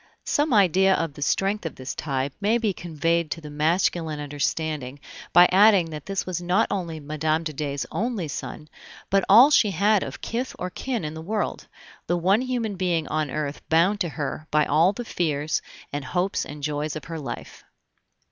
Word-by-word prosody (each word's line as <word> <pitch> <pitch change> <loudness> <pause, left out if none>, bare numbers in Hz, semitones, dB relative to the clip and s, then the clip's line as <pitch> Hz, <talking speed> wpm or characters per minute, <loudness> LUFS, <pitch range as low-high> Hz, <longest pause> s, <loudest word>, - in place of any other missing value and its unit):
Some 295 0 +1
idea 190 -2 +4
of 165 -3 -2
the 145 - -11
strength 195 +8 0
of 165 - -5
this 130 0 -6
tie 135 -1 -2
may 215 +4 +3
be 220 -4 0
conveyed 165 -1 -1
to 140 - -4
the 150 -2 -10
masculine 160 0 0
understanding 145 -1 -3 0.3
by 175 +1 +8
adding 195 -3 +5
that 150 -2 -8
this 195 0 -2
was 180 -1 -3
not 180 +5 +2
only 170 -5 -3
Mme. 155 +2 -1
de 155 -1 -4
Dey's 140 -1 -3
only 220 -6 -2
son, 150 +1 -6 0.4
but 195 0 +3
all 240 +9 +8
she 220 -7 +5
had 200 +3 +3
of - - -6
kith 245 +3 -4
or 180 0 -4
kin 240 -3 -3
in 150 - -4
the 160 - -7
world, 210 +5 -3 0.4
the 175 - +1
one 190 +6 +3
human 240 -6 -2
being 175 -4 0
on 155 -1 -1
earth 150 0 -3
bound 175 +6 +3
to 175 -4 0
her 150 +2 -5
by 150 0 +3
all 165 +5 +4
the 240 +4 -6
fears 155 -6 -1 0.3
and 145 0 -3
hopes 180 +8 -1
and 145 0 -9
joys 150 +1 -2
of 155 - -6
her 165 -1 -6
life. 130 -5 -7
165 Hz, 190 wpm, -24 LUFS, 150-195 Hz, 0.4 s, by